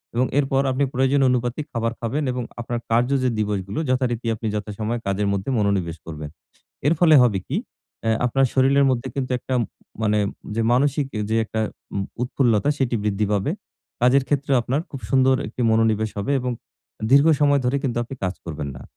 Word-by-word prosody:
এবং 125 Hz, +2 st, +3 dB
এরপর 135 Hz, -1 st, +2 dB
আপনি 130 Hz, +2 st, +1 dB
প্রয়োজন 135 Hz, +2 st, +2 dB
অনুপাতে 125 Hz, +1 st, 0 dB
খাবার 115 Hz, -1 st, -1 dB
খাবেন 125 Hz, +6 st, -2 dB
এবং 125 Hz, 0 st, -3 dB, 0.2 s
আপনার 120 Hz, 0 st, -3 dB
কার্য 120 Hz, +2 st, +3 dB
যে 130 Hz, -, +3 dB
দিবসগুলো 105 Hz, +3 st, -2 dB
যথারীতি 125 Hz, -2 st, 0 dB
আপনি 110 Hz, +1 st, -4 dB
যথাসময়ে 105 Hz, +3 st, -3 dB
কাজের 100 Hz, +1 st, 0 dB
মধ্যে 100 Hz, +5 st, -3 dB
মনোনিবেশ 95 Hz, -5 st, 0 dB
করবেন। 75 Hz, -2 st, -7 dB, 0.6 s
এর 155 Hz, -, +4 dB
ফলে 160 Hz, -2 st, +6 dB
হবে 110 Hz, -6 st, +3 dB
কী, 145 Hz, -, -2 dB, 0.5 s
অ্যা 115 Hz, 0 st, +2 dB
আপনার 135 Hz, +2 st, +2 dB
শরীরের 140 Hz, +1 st, +4 dB
মধ্যে 130 Hz, 0 st, -1 dB
কিন্তু 135 Hz, -2 st, -3 dB
একটা 130 Hz, -, -4 dB, 0.5 s
মানে 105 Hz, -1 st, +2 dB, 0.4 s
যে 115 Hz, -, 0 dB
মানসিক 140 Hz, +2 st, +2 dB, 0.2 s
যে 110 Hz, -, +2 dB
একটা 110 Hz, 0 st, -3 dB
অ্যা 100 Hz, -, -7 dB, 0.2 s
উৎফুল্লতা 125 Hz, -1 st, +1 dB
সেটি 125 Hz, -3 st, 0 dB
বৃদ্ধি 105 Hz, 0 st, 0 dB
পাবে। 100 Hz, -2 st, +1 dB, 0.5 s
কাজের 130 Hz, +2 st, +4 dB
ক্ষেত্রেও 140 Hz, -2 st, +1 dB
আপনার 130 Hz, +5 st, 0 dB
খুব 140 Hz, -, -7 dB
সুন্দর 130 Hz, 0 st, +4 dB
একটি 115 Hz, +3 st, -8 dB
মনোনিবেশ 110 Hz, -1 st, +2 dB
হবে 100 Hz, +8 st, -1 dB
এবং 125 Hz, 0 st, -2 dB, 0.6 s
দীর্ঘ 140 Hz, +3 st, +6 dB
সময় 145 Hz, -1 st, +4 dB
ধরে 125 Hz, +3 st, +1 dB
কিন্তু 125 Hz, -4 st, -2 dB
আপনি 120 Hz, +3 st, -7 dB
কাজ 90 Hz, 0 st, -1 dB
করবেন 75 Hz, -3 st, -5 dB
না। 65 Hz, -, -10 dB
120 Hz, 175 wpm, -23 LUFS, 105-135 Hz, 0.6 s, ফলে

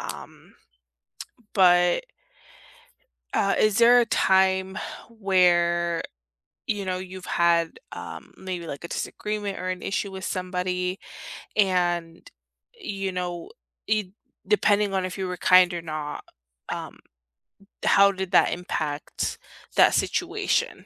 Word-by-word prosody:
Um, -, -, -9 dB, 1.0 s
but 180 Hz, -, +4 dB, 1.3 s
uh, 195 Hz, -, +2 dB
is 215 Hz, -1 st, +3 dB
there 240 Hz, +1 st, +7 dB
a 235 Hz, -, +3 dB
time 190 Hz, -1 st, +2 dB, 0.3 s
where, 175 Hz, -5 st, +2 dB, 0.6 s
you 205 Hz, -3 st, -2 dB
know, 185 Hz, -1 st, -2 dB
you've 185 Hz, 0 st, -8 dB
had, 170 Hz, -1 st, +2 dB
um, -, -, -9 dB
maybe 180 Hz, -3 st, -6 dB
like 145 Hz, +1 st, -7 dB
a -, -, -5 dB
disagreement 210 Hz, +1 st, -4 dB
or 185 Hz, +1 st, -4 dB
an 185 Hz, 0 st, -3 dB
issue 200 Hz, 0 st, -2 dB
with 190 Hz, 0 st, -7 dB
somebody 180 Hz, 0 st, -2 dB, 0.6 s
and, 175 Hz, -4 st, 0 dB, 0.4 s
you 195 Hz, -, -4 dB
know, 180 Hz, -, -4 dB, 0.4 s
it 215 Hz, -2 st, +1 dB, 0.4 s
depending 210 Hz, -, +2 dB
on 190 Hz, -1 st, 0 dB
if 185 Hz, +1 st, -6 dB
you 190 Hz, -1 st, -2 dB
were 180 Hz, 0 st, -4 dB
kind 180 Hz, -1 st, +5 dB
or 170 Hz, -, -3 dB
not, 155 Hz, -2 st, -5 dB, 0.5 s
um, -, -, -6 dB, 0.9 s
how 200 Hz, 0 st, +6 dB
did 190 Hz, -1 st, -5 dB
that -, -, +5 dB
impact 155 Hz, -4 st, -3 dB, 0.4 s
that -, -, +6 dB
situation? -, -, -1 dB
185 Hz, 120 wpm, -25 LUFS, 175-195 Hz, 1.3 s, there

